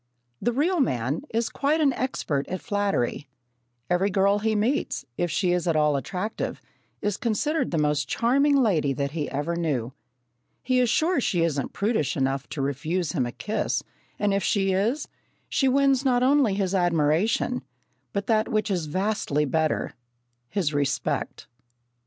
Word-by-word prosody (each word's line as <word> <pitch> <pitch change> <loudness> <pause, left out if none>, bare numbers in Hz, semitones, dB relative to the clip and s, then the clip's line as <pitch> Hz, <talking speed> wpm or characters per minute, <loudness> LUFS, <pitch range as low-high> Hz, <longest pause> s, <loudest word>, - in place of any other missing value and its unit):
The 240 - +1
real 320 +8 +1
man 130 - 0
is 230 +1 0
quite 295 +3 0
an 285 -4 +3
expert 160 - -2
at 185 - -3
flattery. 200 - -1 0.6
Every 180 +3 +2
girl 200 +1 +3
he 220 +1 0
meets, 225 - 0
if 175 - -1
she 175 +3 +1
is 180 0 0
at 165 - +2
all 150 -1 +3
attractive, 185 +9 -3 0.4
is 205 -1 0
considered 295 +8 0
the 170 - -1
most 150 -1 +1
charming 280 +5 +3
lady 185 - +2
that 140 +1 -2
he 150 -2 -3
ever 150 +5 -2
knew. 135 -8 -1 0.7
He 255 0 +2
is 250 -2 +3
sure 320 +3 +2
she 175 -7 +1
isn't 145 -5 -1
prudish 205 - 0
enough 135 0 -1
to 140 - -3
refuse 155 +5 -1
him 130 -9 0
a - - -5
kiss, 170 - -2 0.3
and 205 -1 +1
if 200 - +1
she 195 0 +1
is, 220 +10 0 0.4
she 270 - +1
wins 275 0 +3
not 250 -2 +2
only 265 -6 +4
his 195 -2 -1
admiration, 175 +7 +1 0.5
but 200 0 -2
that 220 -1 +2
which 215 -2 0
is 175 -5 -1
vastly 185 -4 0
better 155 +2 0 0.6
his 170 -7 -1
respect. 145 -1 -1
195 Hz, 160 wpm, -25 LUFS, 150-235 Hz, 0.7 s, only